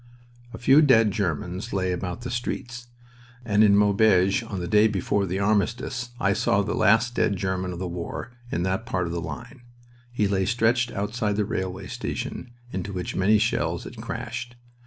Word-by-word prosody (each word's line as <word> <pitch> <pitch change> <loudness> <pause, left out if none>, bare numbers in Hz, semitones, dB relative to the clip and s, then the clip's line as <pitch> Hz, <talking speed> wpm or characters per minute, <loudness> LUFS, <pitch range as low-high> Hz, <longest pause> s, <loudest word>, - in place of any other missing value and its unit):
A - - -8
few 135 +5 +5
dead 115 -8 +5
Germans 95 +3 -3
lay 95 -2 0
about 90 +3 -4
the 125 - -5
streets, 120 0 -4 0.6
and 105 -1 +4
in 100 -1 +6
Maubeuge 100 0 +4
on 110 -5 -5
the 90 - -4
day 105 +4 +5
before 100 -1 0
the 90 +2 -2
armistice 110 +4 0
I 100 -4 +2
saw 100 -1 +2
the - - -2
last 110 +3 +3
dead 100 - +1
German 95 -1 -2
of 90 - -6
the 90 +1 -3
war 90 +6 -5 0.2
in 85 - -1
that 95 +5 -2
part 90 -8 -1
of 85 - -4
the 85 - -2
line. 120 - -8 0.5
He 105 -4 +1
lay 95 -1 0
stretched 120 +1 +2
outside 105 0 -2
the 105 0 0
railway 95 -1 -3
station 125 - -5 0.2
into 95 +2 -4
which 90 -2 -4
many 105 +3 +4
shells 115 +2 0
had - - -10
crashed. 120 0 -5
105 Hz, 180 wpm, -25 LUFS, 95-115 Hz, 0.6 s, in